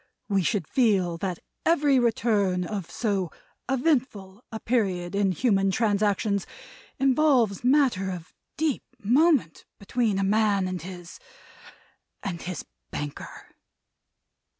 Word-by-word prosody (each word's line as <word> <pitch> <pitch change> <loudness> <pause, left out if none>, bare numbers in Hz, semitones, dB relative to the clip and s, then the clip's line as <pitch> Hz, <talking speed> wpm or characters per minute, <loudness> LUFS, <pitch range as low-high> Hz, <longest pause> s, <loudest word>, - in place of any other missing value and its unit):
We 195 -2 +2
should 185 -2 -1
feel 195 -9 +2
that 180 0 -3 0.3
every 290 -5 +3
return 210 -6 +1
of 195 -3 -5
so 200 -6 -1 0.4
eventful 245 -7 -1
a 220 - -5
period 195 -7 -1
in 200 -1 +2
human 195 0 +2
transactions 205 -1 +1 0.5
involves 260 -6 +3
matter 250 -8 +3
of 180 -2 -7 0.2
deep 305 -4 0 0.2
moment 260 - +2
between 215 0 -1
a 195 - +1
man 200 -1 +2
and 185 -1 -4
his 175 -1 -9 1.0
and 180 -4 -4
his 180 -3 -5 0.2
banker." 145 -1 -7
205 Hz, 110 wpm, -26 LUFS, 185-245 Hz, 1.0 s, every